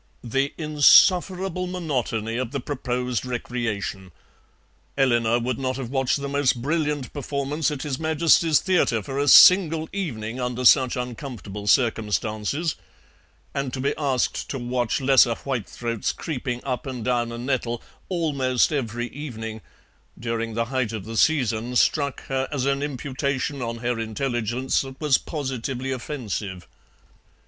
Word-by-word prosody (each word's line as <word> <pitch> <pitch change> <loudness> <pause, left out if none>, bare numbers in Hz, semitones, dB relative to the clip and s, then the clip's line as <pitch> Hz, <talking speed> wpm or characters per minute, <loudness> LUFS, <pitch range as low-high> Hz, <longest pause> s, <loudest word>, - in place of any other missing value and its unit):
The 135 +4 0
insufferable 180 +4 +4
monotony 125 -10 -2
of 125 -2 -2
the 140 - -1
proposed 125 -3 -2
recreation! 115 -6 -4 0.9
Eleanor 120 -4 +3
would 120 +1 -2
not 130 -1 -2
have 130 -3 -5
watched 135 0 +1
the 140 - -4
most 140 -3 +1
brilliant 150 0 -1
performance 140 +1 -2
at 145 -3 -4
His 135 -3 -3
Majesty's 160 0 +3
Theatre 165 - +1
for 135 +7 -4
a 145 - +1
single 165 -2 +7
evening 125 - -4
under 125 0 -2
such 130 0 +6
uncomfortable 120 -5 -6
circumstances, 110 +5 +1 0.8
and 140 -2 -2
to 130 - -3
be 140 +2 0
asked 135 -4 -1
to 135 - -3
watch 120 0 -1
lesser 130 -3 +5
whitethroats 120 -3 -3
creeping 125 -5 -4
up 130 +1 -3
and 125 -4 -5
down 120 -2 0
a 115 - -6
nettle 120 -1 -2 0.3
"almost 145 -7 +1
every 120 -4 -2
evening" 110 -6 -7 0.6
during 115 -1 -3
the 115 0 0
height 125 -4 0
of 105 -4 -5
the 115 +1 -6
season 120 -3 +1
struck 140 +2 +1
her 135 0 -1
as 135 -3 -1
an 140 0 +1
imputation 140 0 -2
on 115 -1 -3
her 120 0 -2
intelligence 120 +2 -1
that 135 -1 -9
was 150 -4 +3
positively 135 -3 -4
offensive. 110 - -5
130 Hz, 140 wpm, -24 LUFS, 120-145 Hz, 0.9 s, single